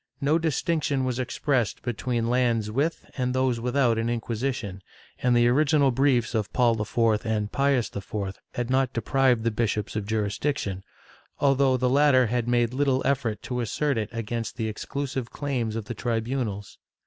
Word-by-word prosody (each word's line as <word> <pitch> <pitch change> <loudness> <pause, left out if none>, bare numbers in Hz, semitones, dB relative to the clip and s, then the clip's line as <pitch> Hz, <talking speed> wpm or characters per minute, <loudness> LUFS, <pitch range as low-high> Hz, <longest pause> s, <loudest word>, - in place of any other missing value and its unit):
No 150 +4 +2
distinction 155 -4 0
was 130 -1 -2
expressed 125 -1 -1
between 120 0 -1
lands 120 -3 +1
with 145 +8 -1
and 125 -1 -1
those 130 -2 +1
without 120 -1 +2
an 115 +1 -1
Inquisition, 115 -4 -3 0.4
and 125 -1 +3
the 120 0 +5
original 140 +2 +3
briefs 125 -2 +2
of 105 -3 -1
Paul 115 -3 +3
IV 110 0 +1
and 110 -2 -1
Pius 140 -4 +1
IV 100 -1 -4 0.2
had 120 0 -2
not 130 0 +2
deprived 125 0 +2
the 115 - +1
bishops 110 -1 -1
of 105 -2 -3
jurisdiction, 105 -1 -2 0.6
although 135 -2 +3
the 125 - +1
latter 135 -1 +5
had 120 +1 -1
made 120 0 +2
little 135 -1 +1
effort 125 -6 0
to 125 -1 -2
assert 140 +5 0
it 110 -2 -2
against 115 +1 -4
the 110 -2 -1
exclusive 130 +3 -4
claims 125 -7 -2
of 115 -2 -4
the 120 - -5
tribimals. 115 -3 -3
120 Hz, 160 wpm, -26 LUFS, 110-135 Hz, 0.6 s, the